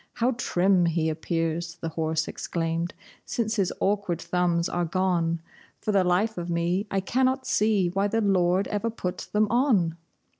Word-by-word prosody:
"How 240 +2 +1
trim 190 -6 +2
he 165 -1 +1
appears," 165 +1 -2
the 165 -1 -5
horse 160 0 -1
exclaimed, 165 0 -3 0.3
"since 230 -1 -2
his 190 -3 +1
awkward 195 -4 0
thumbs 175 -2 +1
are 175 - -1
gone! 170 -1 0 0.4
For 215 - -1
the 195 -2 +4
life 185 +4 +1
of 175 0 -5
me 175 +4 0
I 195 - 0
cannot 260 +5 +1
see 210 -4 +2
why 195 +3 +1
the 225 +2 0
Lord 190 -1 +2
ever 210 +2 -1
put 180 -5 -5
them 210 +1 +3
on!" 220 - +2
180 Hz, 160 wpm, -26 LUFS, 170-210 Hz, 0.4 s, the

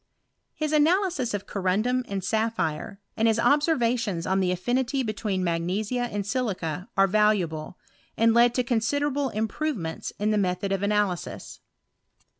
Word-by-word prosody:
His 305 -1 -2
analysis 310 - +2
of 200 0 -5
corundum 210 +7 0
and 195 -1 -3
sapphire, 200 -5 -1 0.2
and 225 - +2
his 225 -1 +3
observations 235 - +1
on 190 +1 +1
the 185 -1 +1
affinity 250 +8 0
between 210 -4 -2
magnesia 195 +8 -1
and 205 -1 -3
silica, 195 - -2
are 195 - +6
valuable, 190 -6 +1 0.4
and 225 0 +4
led 235 +1 +4
to 250 - +2
considerable 275 +4 0
improve 230 +7 -2
ments 160 -3 -5
in 210 +1 0
the 210 - +2
method 185 0 -1
of 195 -1 0
analysis. 205 -3 -1
215 Hz, 140 wpm, -26 LUFS, 190-250 Hz, 0.4 s, are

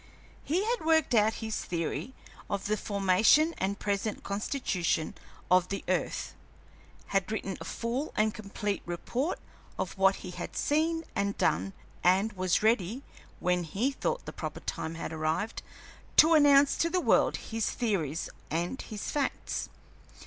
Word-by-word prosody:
He 340 +7 +1
had 475 -2 0
worked 320 -4 +3
out 220 0 +4
his 220 - -2
theory 170 +9 -3 0.3
of 200 -1 -2
the 215 - +1
formation 205 - +4
and 195 +1 -1
present 205 +1 -2
constitution 200 - -1 0.4
of 180 -1 +5
the 195 - -3
earth; - - -1 0.8
had 195 +1 0
written 195 -3 -2
a - - -6
full 240 - -3
and 215 0 +2
complete 205 -1 -3
report 245 - -2 0.4
of - - -3
what 195 0 +5
he 180 - -5
had 175 0 -6
seen 325 +2 +1
and 200 0 0
done, 95 +4 +1 0.3
and 195 +5 +3
was 185 0 +1
ready, 220 +3 +2 0.4
when 180 0 +1
he 205 - 0
thought - - -2
the - - -7
proper - - -5
time 160 +1 -4
had 165 -1 -5
arrived, 160 +7 -1 0.6
to 320 +2 +8
announce 285 -2 +6
to 335 - +2
the 365 - +1
world - - +3
his 225 -2 -2
theories 175 - -1 0.2
and 175 - -2
his 215 -3 -5
facts. 290 -2 -2
205 Hz, 150 wpm, -30 LUFS, 180-270 Hz, 0.8 s, to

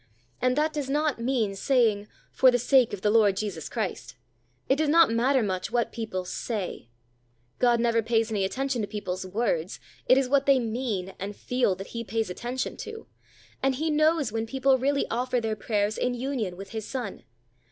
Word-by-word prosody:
And 255 0 +2
that 305 +2 +1
does 290 -3 -3
not 295 -2 0
mean 235 -5 0
saying, 215 -2 +2 0.2
"For 260 - +5
the 245 - +3
sake 250 0 +4
of 205 - -5
the 210 - +3
Lord 210 -3 +4
Jesus 200 -7 -4
Christ." 215 -6 -4 0.5
It 265 - +3
does 310 0 +1
not 330 -3 +6
matter 250 +2 +2
much 185 -3 -2
what 240 0 0
people 215 -6 -4
say. 185 - -4 0.7
God 240 -1 +4
never 230 -1 +2
pays 225 0 +1
any 205 -3 0
attention 260 +4 -1
to 205 - -2
people's 190 -3 -4
words; 185 -4 -1 0.3
it 255 - +6
is 270 -1 +2
what 275 +1 +2
they 275 -1 +6
mean 225 -6 -2
and 200 +2 -5
feel 250 -5 0
that 195 +1 -9
He 230 0 -3
pays 220 -2 -2
attention 245 +7 -4
to; 445 0 -8 0.6
and 270 0 +2
He 315 +4 -1
knows 310 -4 +2
when 225 0 -2
people 265 +1 +2
really 280 +2 +1
offer 250 +1 0
their 220 -2 -2
prayers 210 -1 -1
in 250 0 0
union 240 -8 -3
with 195 0 -9
His 220 -2 -5
Son. 245 -7 -5
235 Hz, 190 wpm, -27 LUFS, 205-265 Hz, 0.7 s, not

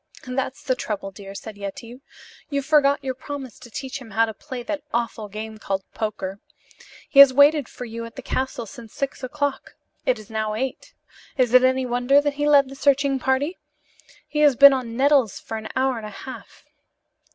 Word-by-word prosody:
"That's 260 +2 -3
the 270 -3 +1
trouble, 205 -5 -4
dear," 195 +1 -10
said 210 0 -9
Yetive. 235 +5 -7 0.5
"You 280 -1 -1
forgot 285 -1 +3
your 260 -1 -2
promise 265 -2 -8
to 240 - -13
teach 265 +3 -6
him 240 - -11
how 225 +2 +3
to 220 - -6
play 255 +2 -8
that 300 +2 -4
awful 230 -3 -2
game 215 +1 -7
called 195 -2 -2
poker. 200 -3 -4 0.7
He 275 - +3
has 280 -1 +11
waited 285 -1 +5
for 250 - -8
you 230 0 -6
at 230 - -11
the 265 - -8
castle 260 -2 -2
since 225 +1 -12
six 275 -1 -4
o'clock. 285 +2 -3 0.3
It 255 - +1
is 215 +1 -13
now 215 -1 -2
eight. 260 +4 -5 0.4
Is 250 -2 +2
it 255 0 +7
any 260 0 +2
wonder 245 +3 +3
that 290 0 0
he 290 +1 0
led 280 -2 +6
the 270 - -9
searching 275 -1 +2
party? 265 +7 0 0.7
He 300 - -3
has 295 -3 +5
been 280 +2 +9
on 240 -3 -3
nettles 270 -5 +3
for 225 - -6
an 220 0 -6
hour 260 -1 +1
and 215 - -8
a 205 - -10
half." 260 - -11
255 Hz, 195 wpm, -23 LUFS, 225-280 Hz, 0.7 s, has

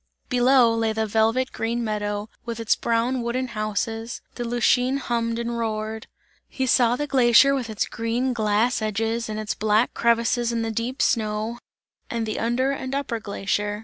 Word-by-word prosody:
Below 250 -1 +4
lay 225 -1 0
the 220 0 0
velvet 225 +5 +1
green 235 +1 -2
meadow, 205 -1 -2 0.2
with 235 -1 -5
its 225 -1 +2
brown 235 +2 0
wooden 250 +2 -2
houses, 225 +1 -3
the 240 - -5
Lütschine 245 +2 +2
hummed 230 -3 -1
and 235 0 -3
roared. 220 0 -3 0.4
He 265 - -2
saw 245 -1 +4
the 295 - -2
glacier 265 0 +5
with 255 -4 -2
its 215 - -1
green 235 +3 -1
glass 220 +2 +1
edges 225 +2 -1
and 215 0 -3
its 215 -1 -2
black 215 +2 +1
crevices 235 0 +2
in 230 -1 -1
the 225 - -2
deep 235 +5 -2
snow, 220 +1 0 0.5
and 230 -1 -2
the 215 - -3
under 240 +4 +1
and 265 -1 -4
upper 265 -5 -2
glacier. 205 0 -2
230 Hz, 170 wpm, -24 LUFS, 220-245 Hz, 0.5 s, glacier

